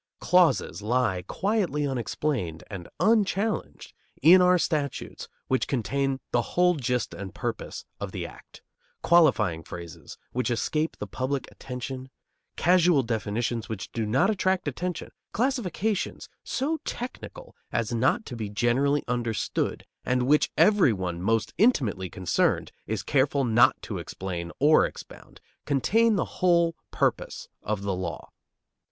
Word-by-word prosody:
Clauses 85 - +3
lie 110 -4 +1
quietly 190 -8 0
unexplained 125 - -2
and 90 -4 -7
unchallenged 210 +1 0 0.3
in 175 +6 +8
our 180 0 +5
statutes 150 -5 -2 0.2
which 130 - +1
contain 135 +2 -1
the 120 - +3
whole 180 +8 +2
gist 125 -6 -1
and 95 -3 -8
purpose - - -4
of - - -5
the - - -4
act; - - -13 0.4
qualifying 120 - +4
phrases 85 +1 -9
which 125 +1 -1
escape 150 +6 -1
the - - -5
public 130 +1 -2
attention, 130 0 -7 0.5
casual 175 -5 +4
definitions 115 0 -2
which 110 -3 -5
do 115 -2 -2
not 135 - +3
attract 190 -4 0
attention, 175 +5 -4 0.2
classifications 220 - -1 0.2
so 295 +5 -1
technical - - -7 0.2
as 115 +1 -1
not 130 - +1
to 125 - -7
be 110 -3 -4
generally 120 +7 +1
understood, 120 -3 -2 0.2
and 125 0 +1
which 150 +4 +3
every 205 - +5
one 90 -4 -3
most 110 +2 0
intimately 120 - +2
concerned 90 0 0 0.2
is 105 -2 -2
careful 140 +3 +2
not 120 -1 +4
to - - -4
explain 85 -3 -5
or 150 +2 +6
expound, - - -8 0.3
contain 215 - +3
the - - +1 0.2
whole 170 -2 +4
purpose - - -1
of 105 -2 -3
the 100 -1 -1
law. 90 -3 -5
130 Hz, 130 wpm, -26 LUFS, 110-175 Hz, 0.5 s, in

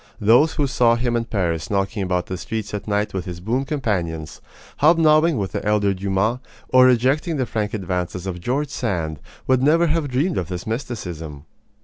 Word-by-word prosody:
Those 120 +10 +4
who 150 - +1
saw 120 -3 +3
him 120 0 -1
in 115 0 0
Paris 85 -8 -2
knocking 100 +1 -1
about 90 -1 -1
the 95 - -5
streets 105 +3 -5
at 105 - -5
night 105 0 0
with 95 -2 -3
his 90 -2 -6
boon 120 +9 -1
companions, 90 - -3 0.4
hobnobbing 155 0 +4
with 100 -3 -2
the - - -4
elder 105 -1 +2
Dumas, 100 +5 0 0.3
or 130 0 +6
rejecting 135 +7 +2
the 130 - 0
frank 110 -2 -2
advances 90 -2 -3
of 90 -2 -5
George 135 +8 -1
Sand, 85 - -3 0.3
would 130 -1 +2
never 160 +5 +4
have 160 -2 0
dreamed 150 +8 0
of 90 - -4
this 90 -1 -5
mysticism. 90 - -5
110 Hz, 185 wpm, -21 LUFS, 95-130 Hz, 0.4 s, or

